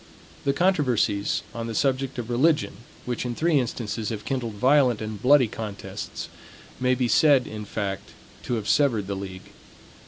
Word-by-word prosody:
The 140 - +3
controversies 130 - +1
on 115 0 -4
the 115 - -5
subject 135 +1 0
of 120 -1 -4
religion, 150 +6 +2 0.3
which 125 -1 -2
in 120 -1 -3
three 160 0 +2
instances 115 -3 -3
have 105 -2 -5
kindled 120 -5 -3
violent 130 0 +4
and 110 -2 -6
bloody 130 0 +5
contests, 105 -2 -6 0.5
may 125 0 +2
be 125 -1 0
said, 140 0 +5
in 105 -1 -7
fact, 100 -2 -4 0.4
to 120 - -1
have 110 -3 -4
severed 120 -9 +2
the 100 0 -3
league. 95 -1 -8
120 Hz, 160 wpm, -25 LUFS, 105-135 Hz, 0.5 s, bloody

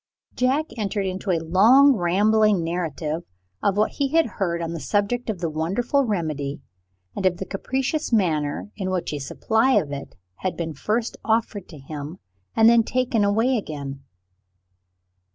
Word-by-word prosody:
Jack 265 +5 +1
entered 205 -2 -1
into 190 +1 -4
a 175 - +3
long 220 - +5
rambling 205 +1 +3
narrative 165 -2 -3 0.4
of 200 0 +1
what 215 - +2
he 280 - -1
had 325 +3 +3
heard 185 -5 -2
on 165 0 -3
the 165 - -4
subject 205 - -1
of 215 - -1
the 170 - 0
wonderful 205 - 0
remedy, 155 - -2 0.6
and - - -3
of 180 -1 0
the 190 - -5
capricious 265 +10 -2
manner 165 -4 0
in 190 -3 -3
which 185 -4 -2
a 145 - -3
supply 225 - +1
of 145 - +2
it 140 -1 -7 0.2
had 185 - -3
been 165 -2 -3
first 220 - -2
offered 220 -3 -1
to 160 - -11
him, 145 +4 -7 0.4
and 225 0 +6
then 235 0 +6
taken 250 -1 0
away 225 +6 +2
again. 140 -6 -7
195 Hz, 160 wpm, -23 LUFS, 165-230 Hz, 0.6 s, and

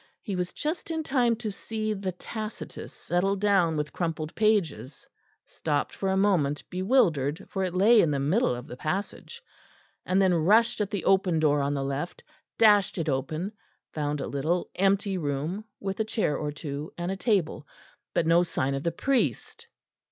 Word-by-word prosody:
He 200 -5 -3
was 180 0 -2
just 315 +4 -4
in 320 -1 -2
time 250 -5 +2
to 220 -2 -4
see 215 +1 -3
the 195 -2 -3
Tacitus 215 +4 -7
settle 190 +3 0
down 190 -5 +2
with 150 0 -3
crumpled 165 -3 -3
pages; 195 - 0 0.4
stopped 150 -2 -2
for 195 - -2
a 190 - +1
moment, 170 -8 +2
bewildered, 180 - +1
for 190 - -1
it 180 -1 -2
lay 215 +4 +6
in 165 - +2
the 145 - 0
middle 150 - +1
of 120 +1 -8
the - - -8
passage; 200 - -4 0.6
and 185 +1 +1
then 190 -2 +4
rushed 210 +8 +3
at 205 - -1
the 200 -5 -3
open 190 -3 +3
door 150 -2 +3
on 140 +1 0
the 135 - -1
left, 140 +5 -4 0.3
dashed 205 -4 +5
it 165 -2 -1
open, 140 +4 -2
and 200 +3 -5 0.4
found 150 -1 -2
a - - -2
little 155 +6 -1
empty 195 0 +1
room, 155 +7 -3
with 195 0 -4
a - - +3
chair 215 -7 0
or 150 -1 -3
two, 145 0 -6
and 175 +1 -2
a - - -2
table 190 - 0 0.5
but 165 - +2
no 165 +1 +5
sign 140 -6 -1
of 135 - -2
the 170 - 0
priest. 275 - -1
180 Hz, 180 wpm, -27 LUFS, 150-210 Hz, 0.6 s, lay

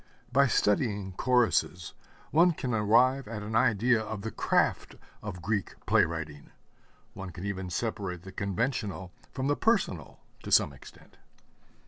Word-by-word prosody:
By 140 +3 +4
studying 105 -4 +1
choruses 115 -7 +1 0.4
one 170 +3 +5
can 130 -5 -3
arrive 120 +5 +3
at 110 -2 -6
an 110 +1 -4
idea 115 +1 +3
of 110 -2 -6
the 110 - -4
craft - - 0 0.3
of 90 -5 -7
Greek 105 -2 -2
play - - +4
writing 80 -3 -6 0.6
one 95 -1 -7
can 90 +2 -8
even 95 -2 -4
separate 90 -3 -3
the 95 - -9
conventional 100 -1 -2 0.2
from 130 0 -3
the 145 +1 +2
personal 195 - 0 0.2
to - - -8
some - - +4
extent. - - -16
105 Hz, 140 wpm, -29 LUFS, 95-125 Hz, 0.6 s, one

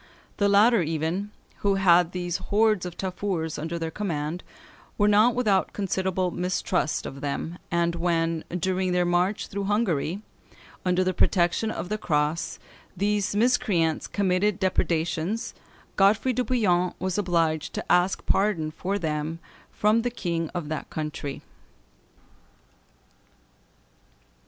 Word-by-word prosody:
The 200 -1 +3
latter 210 +2 +5
even, 165 +5 -2 0.3
who 200 -1 +1
had 180 -3 +4
these 175 -1 -2
hordes 210 -3 +1
of 175 - -9
Tafurs 185 -4 -3
under 165 +3 -3
their 165 -1 -3
command, 165 -3 -3 0.5
were 205 - +3
not 215 +3 +5
without 210 -6 +1
considerable 190 -2 -1
mistrust 180 -2 -1
of 135 +1 -7
them, 155 +4 -4
and 170 0 +1
when, 165 -1 0
during 185 +1 -1
their 180 0 +2
march 180 +4 +1
through 200 0 -4
Hungary, 195 -3 0 0.6
under 180 0 +2
the 185 0 0
protection 180 +4 +2
of 185 - -4
the 215 0 -2
cross, 150 -2 0 0.4
these 205 +1 0
miscreants 205 -8 +2
committed 195 0 +1
depredations, 175 +3 0 0.4
Godefroy 210 +6 +4
de 250 - 0
Bouillion 180 -9 +1
was 185 +1 -2
obliged 165 -5 0
to - - -3
ask 180 +2 +2
pardon 185 -6 +1
for 195 +5 -2
them 155 -2 -2 0.3
from 215 +2 +2
the 245 - -1
king 170 -8 -3
of 175 -4 -3
that 155 - -4
country. 150 -2 -5
180 Hz, 125 wpm, -26 LUFS, 165-205 Hz, 0.6 s, latter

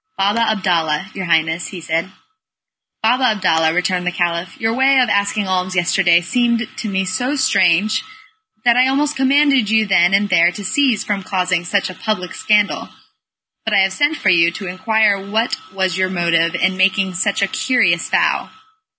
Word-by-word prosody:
"Baba 205 +4 +1
Abdalla, 185 -6 -1
your 190 - -5
Highness," 165 0 0 0.2
said 165 +2 -1
he. 185 - -19 0.9
"Baba 250 +4 +2
Abdalla," 160 -5 +1
returned 180 +1 -1
the - - +1
Caliph, 170 0 -3
"your 225 0 -1
way 265 +2 +3
of 250 -3 +2
asking 200 0 0
alms 185 0 -2
yesterday 175 -1 +2
seemed 235 +4 0
to 220 - -4
me 190 -1 -1
so 245 +10 -2
strange, 200 - +1 0.6
that 240 -1 +4
I 255 +1 +4
almost 290 +3 0
commanded 270 -4 +2
you 220 0 +2
then 190 -1 +3
and 205 +1 +1
there 170 -2 +3
to 205 - -8
cease 255 -1 +1
from 205 -2 -3
causing 185 -2 -1
such 200 +3 0
a 185 - -8
public 180 -1 -4
scandal. 210 -1 0 0.7
But 220 -2 -1
I 195 - +5
have 190 0 +1
sent 290 +7 0
for 200 - 0
you 170 -1 +4
to 190 +3 -8
inquire 205 +2 +1
what 220 +4 -2
was 190 -1 -2
your 185 0 +1
motive 170 -2 0
in 185 +2 0
making 190 0 +1
such 200 +2 -1
a - - +2
curious 190 -9 0
vow. - - 0
190 Hz, 175 wpm, -17 LUFS, 180-220 Hz, 0.9 s, I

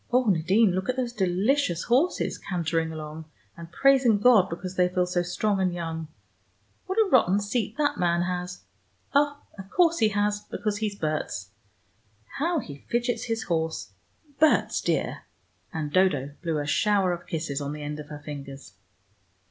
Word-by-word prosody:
Oh, 250 +1 +4
Nadine, 190 +3 +3
look 190 +4 -2
at 255 - +1
those 250 -2 -2
delicious 190 - +1
horses, 265 +9 +1
cantering 165 -3 -1
along, 155 0 -7 0.3
and 170 0 -10
praising 265 -4 +4
God 210 -3 +5
because 180 +2 -6
they 180 -1 +3
feel 180 0 +1
so 180 0 0
strong 195 +3 0
and 185 -1 +2
young! 165 -2 -4 0.8
What 380 +2 -3
a 440 -2 +4
rotten 205 -6 +4
seat 210 +1 -2
that 295 -1 +1
man 175 -1 +2
has: 180 0 -4 0.5
oh, 290 0 +3 0.2
of 190 0 -9
course 335 - +3
he 220 - +5
has, 205 0 0
because 210 0 -3
he's 210 -2 -2
Berts. 155 - -3 0.9
How 335 +4 +1
he 145 - -6
fidgets 240 0 0
his 225 -1 -2
horse 160 -2 -2 0.5
Berts, 315 0 +3
dear - - -1 0.2
" - - -41
And 155 -2 -4
Dodo 150 -8 +2
blew 165 -3 -1
a 145 - -2
shower 195 +4 +2
of 175 - -8
kisses 155 -3 -3
on 140 0 -3
the 150 0 -6
end 150 +1 -5
of 150 - -9
her 150 -1 -9
fingers. 140 -6 -8
185 Hz, 170 wpm, -26 LUFS, 160-225 Hz, 0.9 s, God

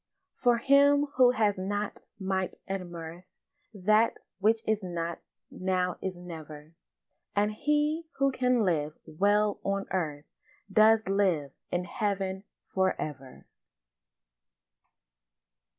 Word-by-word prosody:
For 245 -2 +2
him 285 +3 +5
who 255 -1 +7
has 215 -5 +1
not 205 +2 -3 0.2
might 190 -1 -2
and 190 -2 -4
mirth 170 +1 -8 0.5
That 215 +2 +2 0.2
which 220 +3 +3
is 220 -1 +1
not 170 -2 -4 0.3
now 185 -1 -1
is 185 -2 -4
never; 160 -3 -10 0.6
And 205 +1 +2
he 300 +6 0
who 275 0 +3
can 250 -2 +2
live 155 -4 0
well 205 +5 +2
on 195 0 -1
earth 155 -5 -2 0.5
Does 220 0 +5
live 185 -8 +1 0.2
in 175 0 -1
heaven 195 -1 -2 0.2
for 190 0 0
ever. 135 -4 -7
195 Hz, 110 wpm, -29 LUFS, 175-220 Hz, 0.6 s, who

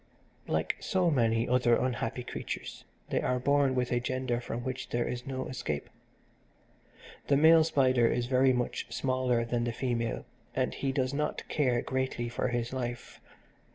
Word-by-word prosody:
Like - - 0
so 185 -4 +1
many 115 -4 +2
other 125 -1 +4
unhappy 125 -1 -1
creatures - - -6 0.3
they - - +1
are 125 - +1
born 140 +1 +2
with 125 -1 0
a 120 - +2
gender 125 -1 -2
from 120 0 -5
which 130 -1 -4
there 120 0 0
is 125 +1 -5
no 130 -1 -3
escape. 75 - -4 1.4
The 140 - +4
male 160 +2 +7
spider 130 -6 +3
is 120 +1 0
very 130 +1 +4
much 125 -1 -2
smaller 130 -3 +1
than 120 0 -1
the 120 - -1
female, 120 -2 -2 0.3
and - - 0
he 135 - -1
does 130 -1 0
not 150 +1 -2
care 125 -5 +1
greatly 130 -2 -2
for 120 - -1
his 120 0 -2
life. 120 -2 -5
125 Hz, 160 wpm, -30 LUFS, 120-130 Hz, 1.4 s, male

